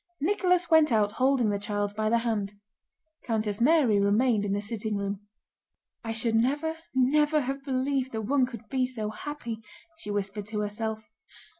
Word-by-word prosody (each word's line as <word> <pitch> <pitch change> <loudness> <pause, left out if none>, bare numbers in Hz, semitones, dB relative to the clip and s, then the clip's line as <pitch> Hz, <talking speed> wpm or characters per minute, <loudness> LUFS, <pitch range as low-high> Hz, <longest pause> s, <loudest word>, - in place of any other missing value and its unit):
Nicholas 360 +1 +2
went 315 -3 +6
out 210 -2 +3
holding 255 -3 +2
the 200 - -1
child 205 0 -2
by 215 0 0
the 235 - +3
hand. 220 -4 -1 0.7
Countess 215 -2 -1
Mary 255 -6 +4
remained 210 +2 +2
in 200 - -2
the 200 - 0
sitting 210 0 -3
room. 200 +1 -4 0.8
"I 225 - -3
should 225 0 -1
never, 290 +8 +1 0.2
never 295 +4 +3
have 275 +1 -4
believed 265 -1 -1
that 220 -1 -3
one 260 +3 +2
could 235 -3 -10
be 260 0 0
so 220 -4 -4
happy," 240 -3 -6 0.4
she 210 - -7
whispered 205 0 -3
to 210 -1 -3
herself. 220 +1 -3
230 Hz, 165 wpm, -28 LUFS, 210-270 Hz, 0.8 s, went